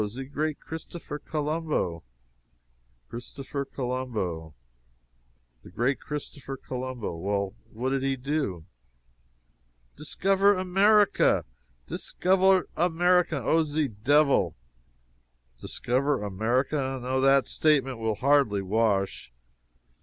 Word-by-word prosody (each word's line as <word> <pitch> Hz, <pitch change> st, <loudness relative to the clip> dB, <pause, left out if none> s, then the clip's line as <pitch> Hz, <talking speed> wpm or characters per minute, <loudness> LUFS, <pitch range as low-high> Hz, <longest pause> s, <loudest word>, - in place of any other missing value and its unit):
ze 120 Hz, +6 st, -6 dB
great 150 Hz, +3 st, -3 dB
Christopher 160 Hz, -1 st, -7 dB
Colombo!" 150 Hz, -, -2 dB, 1.1 s
"Christopher 135 Hz, -, -6 dB
Colombo 120 Hz, -, -4 dB, 1.1 s
the -, -, -13 dB
great 120 Hz, +9 st, 0 dB
Christopher 145 Hz, -2 st, -6 dB
Colombo. 125 Hz, -7 st, -5 dB
Well, 100 Hz, +3 st, -2 dB, 0.2 s
what 125 Hz, +4 st, -2 dB
did 135 Hz, -1 st, 0 dB
he 135 Hz, 0 st, 0 dB
do?" 130 Hz, -, -2 dB, 1.3 s
"Discover 195 Hz, +6 st, +2 dB
America! 195 Hz, +3 st, +3 dB, 0.4 s
discover 190 Hz, -, +2 dB
America, 175 Hz, -3 st, +2 dB
Oh, 165 Hz, +7 st, +3 dB
ze 150 Hz, -2 st, -1 dB
devil!" 120 Hz, -, +2 dB, 1.0 s
"Discover 130 Hz, 0 st, -1 dB
America. 130 Hz, +7 st, 0 dB
No 130 Hz, +1 st, -1 dB
that 135 Hz, 0 st, +4 dB
statement 135 Hz, -5 st, +2 dB
will 110 Hz, -1 st, -1 dB
hardly 130 Hz, -6 st, +2 dB
wash. 100 Hz, -, 0 dB
135 Hz, 90 wpm, -27 LUFS, 115-155 Hz, 1.3 s, that